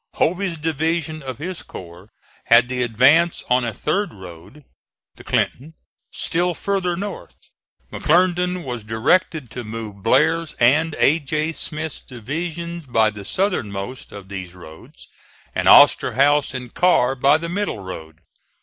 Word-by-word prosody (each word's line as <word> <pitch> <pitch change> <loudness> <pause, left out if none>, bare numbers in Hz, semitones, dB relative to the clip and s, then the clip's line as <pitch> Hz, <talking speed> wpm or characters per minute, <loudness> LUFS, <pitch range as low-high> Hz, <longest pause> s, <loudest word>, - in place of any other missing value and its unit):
Hovey's 180 +1 0
division 160 +1 -2
of 130 -3 -6
his 175 +4 -6
corps 90 +3 -11 0.4
had 115 +1 +5
the 125 -1 -2
advance 135 +9 +3
on 125 0 +3
a 120 - -2
third 155 - -2
road 95 - -13 0.5
(the - - -14
Clinton) 155 +5 -2 0.4
still 175 +1 0
farther 190 -3 -1
north. 200 +1 -7 0.6
McClernand 180 +1 +1
was 120 -4 -5
directed 120 - 0
to 125 - -6
move 110 -2 -7
Blair's 160 +9 +2
and 150 +7 +2
A. 155 +4 +4
J. 155 +2 -2
Smith's 155 -1 -4
divisions 165 +6 -6
by 110 -3 +2
the 105 -1 -9
southernmost 125 - -3
of 100 -2 -10
these 95 -2 -7
roads, 80 -3 -14 0.5
and - - -1
Osterhaus 145 +1 +5
and 125 -1 -7
Carr 135 -8 +3
by 135 +3 +3
the 165 +1 -5
middle 200 - -2
road. 80 -3 -9
145 Hz, 135 wpm, -21 LUFS, 115-170 Hz, 0.6 s, had